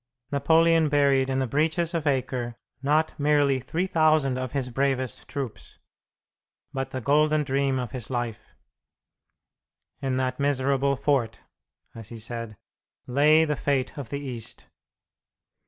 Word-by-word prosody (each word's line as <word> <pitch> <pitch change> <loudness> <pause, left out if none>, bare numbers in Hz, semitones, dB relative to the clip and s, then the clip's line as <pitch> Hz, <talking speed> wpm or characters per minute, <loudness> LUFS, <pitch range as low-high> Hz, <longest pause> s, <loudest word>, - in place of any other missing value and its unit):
Napoleon 160 +2 +4
buried 140 -2 +3
in 130 - 0
the 135 - +1
breaches 160 +6 0
of 160 -3 -1
Acre 125 -3 -1 0.3
not 155 +3 +2
merely 145 -2 +3
3,000 155 -2 +1
of 130 -1 -4
his 130 -2 -2
bravest 130 -1 -1
troops, 135 -6 -6 1.0
but 135 0 -3
the 130 - -5
golden 150 +3 +3
dream 135 -1 0
of 125 -4 -3
his 125 -3 -6
life. 120 -4 -3 1.5
"In 135 -2 -1
that 130 0 -1
miserable 140 0 +1
fort," 135 -4 0 0.5
as 115 -1 -10
he 115 - -8
said, 115 -1 -6 0.5
"lay 150 +5 +4
the 150 -1 -1
fate 135 0 -1
of 140 -6 -7
the 140 - -3
East." 125 -6 -7
135 Hz, 130 wpm, -26 LUFS, 130-150 Hz, 1.5 s, Napoleon